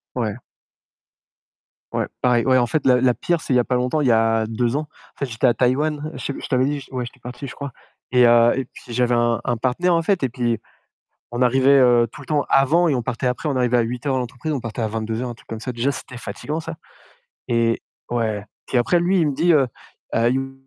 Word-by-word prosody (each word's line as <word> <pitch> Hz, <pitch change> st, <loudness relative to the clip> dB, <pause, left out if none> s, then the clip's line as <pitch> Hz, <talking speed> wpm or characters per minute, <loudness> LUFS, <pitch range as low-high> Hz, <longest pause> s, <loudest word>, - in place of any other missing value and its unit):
Ouais. 115 Hz, -4 st, -1 dB, 1.6 s
Ouais -, -, 0 dB, 0.2 s
pareil, 120 Hz, -1 st, +3 dB
ouais. 130 Hz, -1 st, +4 dB
En 120 Hz, -, +3 dB
fait 155 Hz, +4 st, -1 dB
la 125 Hz, -1 st, +5 dB
la 130 Hz, -1 st, +4 dB
pire 170 Hz, +6 st, -1 dB
c'est -, -, -3 dB
il 125 Hz, -, +4 dB
y -, -, +5 dB
a 120 Hz, -, +3 dB
pas 125 Hz, -, -1 dB
longtemps, 125 Hz, +5 st, 0 dB
il 145 Hz, -, +1 dB
y -, -, +5 dB
a 115 Hz, 0 st, +2 dB
2 115 Hz, +3 st, -1 dB
ans, 150 Hz, 0 st, -3 dB
en -, -, -25 dB
fait, 140 Hz, -, -1 dB
j'étais 115 Hz, 0 st, 0 dB
à 120 Hz, -, +5 dB
Taïwan, 150 Hz, +5 st, 0 dB
je -, -, -4 dB
te -, -, -8 dB
je -, -, -6 dB
t'avais 130 Hz, -2 st, +2 dB
dit, 145 Hz, +1 st, -1 dB
je 130 Hz, -, -14 dB
ouais, 130 Hz, -2 st, -3 dB
j'étais 120 Hz, +1 st, -11 dB
parti, 125 Hz, +3 st, -8 dB
je -, -, -8 dB
crois 140 Hz, -2 st, -6 dB, 0.4 s
et 125 Hz, -1 st, +7 dB
heu, 120 Hz, 0 st, +6 dB
et 135 Hz, -, -1 dB
puis 120 Hz, 0 st, -13 dB
j'avais 125 Hz, 0 st, +2 dB
un 120 Hz, 0 st, +2 dB
un 120 Hz, -, 0 dB
partenaire 135 Hz, +9 st, +1 dB
en 165 Hz, -, +3 dB
fait 190 Hz, 0 st, +1 dB
et 130 Hz, -, +1 dB
puis 120 Hz, -2 st, -1 dB, 0.7 s
on 120 Hz, -, -3 dB
arrivait, 135 Hz, +2 st, +5 dB
heu, 120 Hz, -2 st, +5 dB
tout 150 Hz, -, -11 dB
le -, -, -11 dB
temps 150 Hz, 0 st, +1 dB
avant 155 Hz, +6 st, +4 dB
et 150 Hz, -, +2 dB
on 125 Hz, -, 0 dB
partait 120 Hz, +3 st, -3 dB
après. 125 Hz, +5 st, -2 dB
On 140 Hz, -, -1 dB
arrivait 125 Hz, -1 st, +2 dB
à 120 Hz, -, +4 dB
8:00 125 Hz, +4 st, -2 dB
à -, -, +1 dB
l'entreprise, 125 Hz, +5 st, -4 dB
on 140 Hz, -, -1 dB
partait 115 Hz, 0 st, -5 dB
à 110 Hz, -, +1 dB
22:00, 115 Hz, +3 st, -3 dB
un -, -, -5 dB
truc 115 Hz, -, -20 dB
comme 115 Hz, -1 st, -5 dB
ça. 125 Hz, -, -4 dB
Déjà 120 Hz, +4 st, 0 dB
c'était 130 Hz, -1 st, -8 dB
fatiguant 140 Hz, +8 st, -5 dB
ça 165 Hz, 0 st, -6 dB, 0.7 s
et 115 Hz, -1 st, +1 dB, 0.3 s
ouais, 110 Hz, -4 st, -1 dB, 0.2 s
puis 130 Hz, -, 0 dB
après 145 Hz, +9 st, +3 dB
lui, 180 Hz, +2 st, +2 dB
il 160 Hz, -, +3 dB
me 145 Hz, -, -1 dB
dit, 170 Hz, +4 st, +3 dB
heu: 140 Hz, -5 st, +4 dB, 0.5 s
«Heu, 135 Hz, +3 st, +1 dB
125 Hz, 255 wpm, -21 LUFS, 120-140 Hz, 1.6 s, et